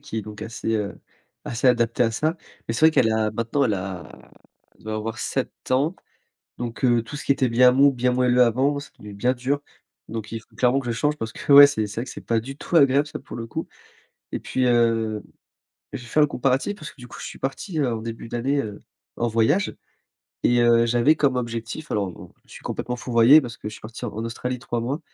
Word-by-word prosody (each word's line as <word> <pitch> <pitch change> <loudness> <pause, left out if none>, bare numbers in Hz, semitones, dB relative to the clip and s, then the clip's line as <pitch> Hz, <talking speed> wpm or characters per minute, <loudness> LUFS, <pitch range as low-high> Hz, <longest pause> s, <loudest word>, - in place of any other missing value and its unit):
qui 145 -6 -7
est - - -4
donc 105 0 -9
assez, 110 0 -2
heu, 105 -1 -3 0.5
assez 120 +2 -2
adaptée 120 -1 +3
à 115 - +1
ça 155 +8 0 0.3
mais 115 - -1
c'est 155 +6 +5
vrai - - +6
qu'elle 115 -6 +3
a, 110 -1 0
maintenant, 115 +5 0
elle 105 - +1
a 95 -2 -7 0.5
elle - - -22
doit 110 0 -4
avoir 110 +1 -4
7 - - -2 0.2
ans. 145 +7 +2 0.6
Donc, 120 +1 -5
heu, 120 -2 +4
tout 150 - -10
ce 145 - -7
qui - - -4
était 130 -2 +1
bien 125 +2 +6
mou, 140 +2 +5
bien 125 0 +1
moelleux 125 0 +3
avant, 130 +5 +2
c'est - - -11
devenu 105 -1 -10
bien 125 +6 +1
dur. 130 +3 -1 0.5
Donc, 110 -1 -6
il 115 - -4
faut - - -26
clairement 130 +2 +3
que 125 - -9
je - - +1
change 150 0 0
parce 115 -2 -5
que, - - -1
ouais, 140 0 +11
c'est 110 -7 -1
c'est 105 +2 -5
vrai 120 - -3
que 125 - -9
c'est - - -8
pas 115 -1 +1
du 135 +4 -8
tout 175 - -7
agréable 140 -1 +5
ça, - - -7
pour 140 - -9
le 115 -1 -5
coup - - -5 0.6
et - - -3
puis, 130 - -1
heu, 115 -3 +2 0.7
j'ai 125 -3 -7
fait 150 - +2
un 150 - +5
comparatif 135 +8 0
parce 155 -7 -9
que, - - -24
du 125 - -10
coup, - - -10
je - - -6
suis - - -9
parti, 155 +5 -3
heu, 130 -4 +1
en - - -2
début 115 0 -7
d'année, 135 +4 0
heu, 105 -2 -7 0.4
en 120 - 0
voyage 115 - +1 0.7
et 120 0 +3
heu, 115 0 +5
j'avais 120 +6 +3
comme 135 -4 +1
objectif 115 +4 -5
alors, 100 -3 -1
bon, - - -13
je - - -21
suis - - -11
complètement 125 0 -4
fourvoyé 120 +4 +6
parce 120 -5 -6
que 105 - -6
je - - -10
suis - - -12
parti 115 +3 -9
en 115 - -3
Australie 125 +2 -4
3 120 -1 -3
mois 135 +7 -2
120 Hz, 240 wpm, -23 LUFS, 115-135 Hz, 0.7 s, ouais